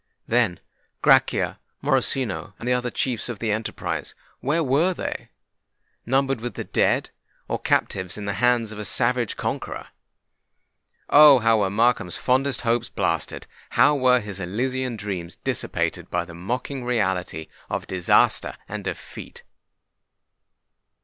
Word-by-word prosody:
Then—Grachia, 110 Hz, -7 st, +1 dB, 0.2 s
Morosino, 115 Hz, -7 st, +1 dB
and 120 Hz, -, -7 dB
the 125 Hz, -, +3 dB
other 125 Hz, 0 st, 0 dB
chiefs 125 Hz, 0 st, -2 dB
of 120 Hz, -, -4 dB
the 110 Hz, +1 st, -1 dB
enterprise—where 135 Hz, +7 st, -3 dB
were 155 Hz, +7 st, +2 dB
they? -, -, -5 dB, 0.8 s
Numbered 135 Hz, -1 st, +1 dB
with 120 Hz, +1 st, -5 dB
the -, -, -4 dB
dead—or -, -, -2 dB
captives 95 Hz, 0 st, 0 dB
in 105 Hz, -, -6 dB
the 100 Hz, -, -1 dB
hands 120 Hz, -3 st, +3 dB
of 110 Hz, -, -8 dB
a -, -, -3 dB
savage -, -, 0 dB
conqueror! -, -, -4 dB, 1.2 s
Oh! 145 Hz, -2 st, +8 dB
how 115 Hz, -2 st, +3 dB
were 100 Hz, -2 st, +1 dB
Markham's 110 Hz, -4 st, +1 dB
fondest 130 Hz, 0 st, +1 dB
hopes 120 Hz, -1 st, 0 dB
blasted! -, -, -2 dB, 0.2 s
how 150 Hz, -, +4 dB
were 130 Hz, -2 st, +4 dB
his 100 Hz, -2 st, -7 dB
elysian 125 Hz, +6 st, -2 dB
dreams 95 Hz, -5 st, -5 dB
dissipated -, -, -2 dB
by 90 Hz, 0 st, -1 dB
the 85 Hz, -, -11 dB
mocking 125 Hz, +9 st, -4 dB
reality 95 Hz, -9 st, -1 dB, 0.2 s
of -, -, -3 dB
disaster 90 Hz, -2 st, +2 dB
and -, -, -5 dB
defeat! -, -, -7 dB
115 Hz, 125 wpm, -24 LUFS, 100-130 Hz, 1.2 s, Oh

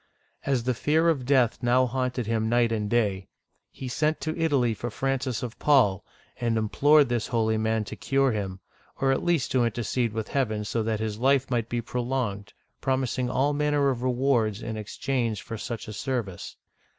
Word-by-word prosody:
As 130 Hz, -4 st, +1 dB
the 125 Hz, +1 st, +1 dB
fear 155 Hz, +8 st, +2 dB
of 135 Hz, -7 st, -1 dB
death 130 Hz, -4 st, +3 dB
now 125 Hz, +1 st, +3 dB
haunted 125 Hz, -1 st, -2 dB
him 110 Hz, 0 st, 0 dB
night 120 Hz, -1 st, +3 dB
and 105 Hz, -2 st, -1 dB
day, 100 Hz, -5 st, 0 dB, 0.4 s
he 130 Hz, -, -8 dB
sent 155 Hz, +5 st, 0 dB
to 155 Hz, 0 st, -2 dB
Italy 140 Hz, -8 st, +2 dB
for 120 Hz, +3 st, -5 dB
Francis 130 Hz, 0 st, -2 dB
of 120 Hz, -2 st, -6 dB
Paul, 125 Hz, -11 st, +3 dB, 0.3 s
and 115 Hz, -2 st, 0 dB
implored 145 Hz, +7 st, +4 dB
this 120 Hz, -2 st, -1 dB
holy 110 Hz, -2 st, +1 dB
man 110 Hz, 0 st, 0 dB
to -, -, -7 dB
cure 135 Hz, -1 st, +1 dB
him, 95 Hz, -3 st, -4 dB, 0.4 s
or 135 Hz, 0 st, +2 dB
at 135 Hz, -, 0 dB
least 170 Hz, -7 st, +1 dB
to 130 Hz, -2 st, +3 dB
intercede 120 Hz, +1 st, -1 dB
with 110 Hz, -1 st, -4 dB
heaven 110 Hz, -6 st, -1 dB
so 115 Hz, -, -1 dB
that 110 Hz, -1 st, -1 dB
his 110 Hz, -1 st, -3 dB
life 135 Hz, +1 st, +2 dB
might 115 Hz, -2 st, 0 dB
be 120 Hz, 0 st, -1 dB
prolonged, 120 Hz, -4 st, -3 dB, 0.3 s
promising 130 Hz, -1 st, 0 dB
all 135 Hz, +4 st, +1 dB
manner 145 Hz, -1 st, +2 dB
of 120 Hz, -2 st, -4 dB
rewards 125 Hz, -4 st, +1 dB
in 110 Hz, -, -4 dB
exchange 115 Hz, +1 st, -2 dB
for 115 Hz, -, -6 dB
such 115 Hz, +1 st, -5 dB
a 110 Hz, -, -6 dB
service. 115 Hz, -7 st, -4 dB
120 Hz, 185 wpm, -26 LUFS, 110-135 Hz, 0.4 s, implored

